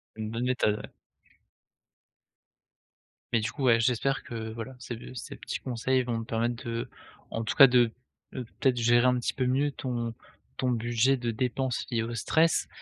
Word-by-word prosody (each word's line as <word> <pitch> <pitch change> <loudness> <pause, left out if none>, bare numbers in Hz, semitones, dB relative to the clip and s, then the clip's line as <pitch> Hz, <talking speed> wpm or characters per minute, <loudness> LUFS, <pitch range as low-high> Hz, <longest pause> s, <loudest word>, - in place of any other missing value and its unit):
Une 110 -1 -4
bonne 115 +2 -2
méthode, 125 -4 +1
ouais. - - -10 2.4
Mais 115 - +4
du 110 +2 -2
coup, 135 - -5
ouais, 115 -2 +5
j'espère 125 +3 +1
que, 110 -1 -5
voilà, 115 +3 -7
ces, 125 -1 -6
heu, 120 +2 -10
ces 125 - -7
petits - - -5
conseils 130 +1 0
vont 120 -2 -2
te - - -7
permettre 115 +1 -1
de 115 0 -3 0.4
en 115 - -2
tout 110 - -2
cas, 135 - +10
de, 120 -2 +4 0.4
heu, 130 - -4 0.2
peut-être, 130 -2 +3
gérer 120 +1 +4
un 125 0 +4
petit 120 - -1
peu 130 - -1
mieux 135 +3 +2
ton 120 -4 -3 0.4
ton 130 -1 +1
budget 120 +2 +2
de 120 -2 -2
dépenses 125 +2 -1
liées 115 -2 0
au 115 +1 -4
stress, 160 +8 +2
120 Hz, 185 wpm, -28 LUFS, 115-130 Hz, 2.4 s, cas